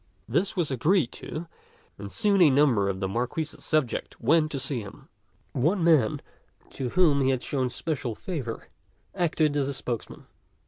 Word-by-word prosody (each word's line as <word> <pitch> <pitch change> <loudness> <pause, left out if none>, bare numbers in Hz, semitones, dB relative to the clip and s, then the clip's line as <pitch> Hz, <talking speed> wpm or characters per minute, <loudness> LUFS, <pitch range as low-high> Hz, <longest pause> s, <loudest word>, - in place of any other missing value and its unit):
This 175 - 0
was 170 -6 0
agreed 150 - +2
to, 160 +3 -7 0.5
and 100 0 -7
soon 205 -3 +2
a 165 - +8
number 130 -8 +3
of 95 -1 -3
the 95 - -1
Marquis's 125 +9 -3
subjects 155 -6 -1
went 155 +5 +3
to 140 - -3
see 130 -2 -1
him. 100 - -12 0.4
One 170 +8 +1
man 155 -10 +3 0.5
to 130 -2 -4
whom 155 -3 +3
he 135 - +2
had 130 -2 0
shown 130 -3 -1
special 125 -3 -3
favor 130 - -5 0.4
acted 155 -5 +1
as 140 -1 0
spokesman. 120 -4 -5
140 Hz, 155 wpm, -27 LUFS, 120-160 Hz, 0.5 s, a